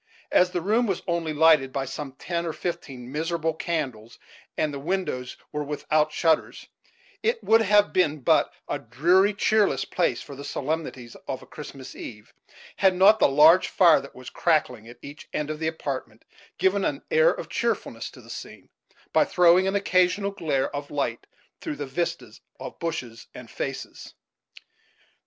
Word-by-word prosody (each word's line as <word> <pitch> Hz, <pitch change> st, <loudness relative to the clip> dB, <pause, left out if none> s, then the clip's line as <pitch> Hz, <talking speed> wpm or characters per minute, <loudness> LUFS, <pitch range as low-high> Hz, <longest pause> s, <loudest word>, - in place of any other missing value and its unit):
As 180 Hz, -, +4 dB
the 180 Hz, -1 st, -3 dB
room 220 Hz, +6 st, +1 dB
was 190 Hz, -3 st, -2 dB
only 170 Hz, -2 st, -1 dB
lighted 155 Hz, -3 st, +4 dB
by 135 Hz, 0 st, -2 dB
some 135 Hz, +1 st, -6 dB
ten 170 Hz, +5 st, -3 dB
or 160 Hz, -, -3 dB
fifteen 130 Hz, -8 st, -6 dB
miserable 160 Hz, +1 st, -1 dB
candles, 135 Hz, -10 st, -4 dB, 0.4 s
and 150 Hz, -2 st, 0 dB
the 140 Hz, -, -5 dB
windows 145 Hz, -6 st, -3 dB
were 150 Hz, 0 st, -3 dB
without 150 Hz, +1 st, 0 dB
shutters, 160 Hz, 0 st, 0 dB, 0.6 s
it 460 Hz, +2 st, 0 dB
would 225 Hz, +1 st, +5 dB
have 205 Hz, -1 st, +3 dB
been 155 Hz, -5 st, +1 dB
but -, -, +3 dB, 0.2 s
a -, -, -2 dB
dreary, 175 Hz, -, +3 dB
cheerless 205 Hz, -, +2 dB
place 175 Hz, -, 0 dB
for 140 Hz, -, -10 dB
the 140 Hz, -, -9 dB
solemnities 140 Hz, -5 st, -4 dB
of 130 Hz, -, -4 dB
a -, -, -13 dB
Christmas 135 Hz, -3 st, -10 dB
eve, 105 Hz, -2 st, -10 dB, 0.4 s
had 190 Hz, -2 st, +4 dB
not 200 Hz, +4 st, +6 dB
the -, -, +6 dB
large 155 Hz, +6 st, +6 dB
fire 170 Hz, -4 st, +5 dB
that 140 Hz, -, -13 dB
was 130 Hz, 0 st, -10 dB
crackling 125 Hz, -9 st, 0 dB
at 120 Hz, +1 st, -12 dB
each 145 Hz, +2 st, -11 dB
end 150 Hz, 0 st, -2 dB
of 155 Hz, -, -6 dB
the 160 Hz, -, -1 dB
apartment 135 Hz, -8 st, -5 dB, 0.3 s
given 190 Hz, +2 st, +2 dB
an -, -, -2 dB
air 480 Hz, +1 st, +5 dB
of -, -, -4 dB
cheerfulness -, -, -2 dB
to -, -, -15 dB
the -, -, -17 dB
scene, -, -, -10 dB, 0.4 s
by -, -, +5 dB
throwing 180 Hz, +1 st, +4 dB
an 195 Hz, -, 0 dB
occasional 195 Hz, 0 st, +2 dB
glare 150 Hz, -8 st, -1 dB
of 145 Hz, 0 st, -5 dB
light 120 Hz, -5 st, -3 dB, 0.3 s
through -, -, -5 dB
the 145 Hz, 0 st, -5 dB
vistas 155 Hz, +6 st, -4 dB, 0.2 s
of -, -, -8 dB
bushes 130 Hz, -9 st, -5 dB
and -, -, -11 dB
faces. -, -, -6 dB
160 Hz, 170 wpm, -25 LUFS, 140-185 Hz, 0.6 s, not